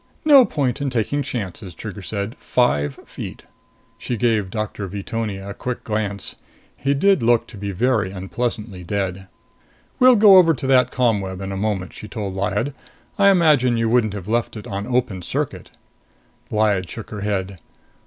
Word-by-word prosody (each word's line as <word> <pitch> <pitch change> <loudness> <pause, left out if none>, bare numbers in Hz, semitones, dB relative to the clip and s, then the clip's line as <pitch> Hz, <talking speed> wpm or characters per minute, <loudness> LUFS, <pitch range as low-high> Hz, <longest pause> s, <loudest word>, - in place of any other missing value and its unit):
"No 280 -4 +8
point 140 - -1
in 140 - 0
taking 125 +4 -1
chances," 100 -8 -5
Trigger 105 +2 -7
said. 100 +4 -4
"Five 75 - +1
feet." - - -8 0.6
She 120 - -3
gave 110 -4 +1
Doctor 105 -1 -4
Veetonia 100 0 -4
a - - -5
quick 125 +3 -5
glance. 105 -2 -3 0.4
He 140 +1 0
did 195 +6 +3
look 120 0 +2
very 100 0 0
unpleasantly 100 0 -4
dead. 95 +1 -3 0.7
"We'll 255 0 +7
go 205 -3 +8
over 165 -3 +6
to 130 - -6
that 130 -2 +4
ComWeb 100 -7 0
in 95 0 -5
a - - -4
moment," 95 -2 -2
she 105 - -9
told 105 -4 -5
Lyad. 105 +7 -1 0.5
"I 200 0 +7
imagine 150 -10 +4
you 115 -1 +1
wouldn't 115 -3 +2
have 95 -2 -7
left 115 0 -1
it 105 - -8
on 100 +1 -4
open 120 -7 0
circuit?" - - -3 0.8
Lyad 105 -4 +1
shook 110 - -8
her 105 - -5
head. 100 -2 -2
110 Hz, 160 wpm, -21 LUFS, 100-125 Hz, 0.8 s, No